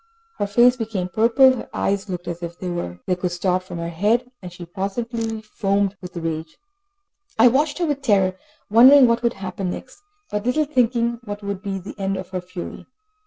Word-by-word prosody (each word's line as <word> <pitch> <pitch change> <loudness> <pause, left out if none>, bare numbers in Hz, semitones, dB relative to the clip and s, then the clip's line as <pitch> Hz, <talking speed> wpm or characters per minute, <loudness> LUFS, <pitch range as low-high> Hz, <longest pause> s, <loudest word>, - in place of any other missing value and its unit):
Her 205 - 0
face 240 +5 +5
became 215 -6 -3
purple, 240 +6 +5
her - - -8
eyes 200 +1 -1
looked 180 -1 -5
as 170 0 -5
if 170 0 -6
they 180 -1 -4
would 175 - -3
start 180 +1 0
from 185 -1 -8
her 170 0 -3
head, 220 +9 +1
and 180 -2 -8
she 175 0 -9
positively 225 +5 -4
foamed 200 -2 0
with 180 -1 -9
rage. 160 -1 -4 0.8
I 235 +2 +7
watched 290 +5 +1
her 350 - 0
with 290 -3 -1
terror, 195 -7 +2 0.3
wondering 255 +5 +8
what 235 0 +2
would 235 0 +1
happen 190 -1 -4
next, 260 - -8 0.3
but 210 +3 -2
little 305 +5 +2
thinking 235 -4 +1
what 205 -2 -7
would 200 -1 -4
be 195 -1 -3
the 190 +1 -8
end 195 0 -1
of 185 - -7
her 185 -1 -4
fury. 180 0 -8
200 Hz, 190 wpm, -22 LUFS, 180-235 Hz, 0.8 s, wondering